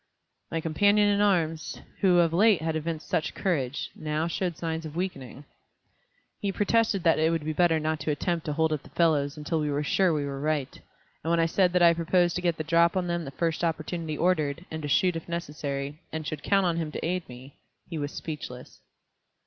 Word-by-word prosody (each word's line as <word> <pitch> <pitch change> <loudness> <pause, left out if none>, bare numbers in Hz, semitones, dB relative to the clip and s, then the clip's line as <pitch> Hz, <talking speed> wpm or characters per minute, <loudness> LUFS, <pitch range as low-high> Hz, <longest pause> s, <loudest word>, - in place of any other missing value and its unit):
My 165 - -1
companion 205 +6 +3
in 205 0 +2
arms, 165 -6 +1 0.2
who 185 -3 +4
of 165 -1 +1
late 205 +2 +5
had 160 -1 -1
evinced 160 0 -3
such 155 - -1
courage, 145 -8 -1
now 155 +1 -2
showed 170 -1 -2
signs 165 -1 -3
of 155 -1 -8
weakening. 145 -6 -5 0.9
He 200 - -1
protested 205 -1 +1
that 165 - +4
it 160 +1 +3
would 165 -2 -1
be 155 - -1
better 165 -1 +3
not 155 0 -1
to 150 - -3
attempt 165 +2 -1
to 150 - 0
hold 160 +1 +1
up 150 - -2
the - - -16
fellows 150 -4 +1
until 155 +2 -2
we 150 -1 -1
were 145 +1 -1
sure 185 +4 +2
we 150 -2 0
were 140 -1 -5
right, 150 -3 -1 0.5
and 160 - -2
when 170 0 +3
I 165 - +4
said 180 +2 +2
that 180 -1 +4
I 170 0 +7
proposed 175 +1 +2
to - - -3
get 170 -3 0
the 155 - -2
drop 170 +3 +3
on 185 - 0
them 170 -1 -2
the - - -5
first 165 +4 -2
opportunity 160 -1 -2
offered, 165 -2 0
and 160 0 -4
to 145 - -4
shoot 180 +5 +3
if 165 +1 -6
necessary, 145 -3 -4
and 160 -1 -4
should 150 +1 -4
count 195 +4 +2
on 170 -2 +1
him 160 -2 -2
to - - -3
aid 180 -1 -2
me, 125 +3 -12 0.3
he 165 -3 -5
was 145 0 -3
speechless. 130 -5 -7
160 Hz, 220 wpm, -27 LUFS, 150-175 Hz, 0.9 s, I